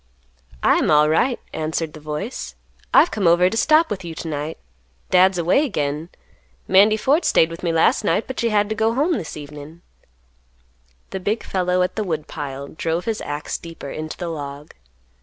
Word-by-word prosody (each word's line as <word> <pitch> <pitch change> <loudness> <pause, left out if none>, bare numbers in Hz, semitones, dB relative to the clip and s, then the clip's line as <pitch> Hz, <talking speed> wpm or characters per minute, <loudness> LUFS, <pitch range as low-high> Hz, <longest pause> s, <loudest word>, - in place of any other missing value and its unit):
"I - - +5
am - - +1
alright," 155 - +3
answered 160 0 -2
the 155 - -10
voice; 155 - -5 0.4
"I've - - +6
come 200 -5 0
over 175 +2 +4
t' - - -3
stop 310 +7 +4
with 190 -2 -3
you 165 -2 -7
to 165 - -6
night; 150 +1 -4 0.5
Dad's 185 +1 +5
away 175 - +3
again; 150 - -2 0.6
Mandy 210 +3 +5
Ford 285 +9 +2
staid 160 0 +3
with 165 - -8
me 170 - 0
last 165 0 +3
night, 170 - +1
but 260 - -6
she 235 - +1
had 210 -1 +2
to - - 0
go 220 +1 +1
home 305 +7 +2
this 175 - -4
evenin'." 150 +3 -10 1.3
The 190 - -3
big 210 +4 -2
fellow 180 -1 0
at 180 - -3
the 215 - 0
woodpile 145 -5 -5
drove 165 +2 -2
his 225 -2 -2
axe 145 +1 -4
deeper 165 -4 -9
into 155 0 -6
the 175 -2 -4
log. 145 -2 -7
170 Hz, 180 wpm, -21 LUFS, 155-210 Hz, 1.3 s, I've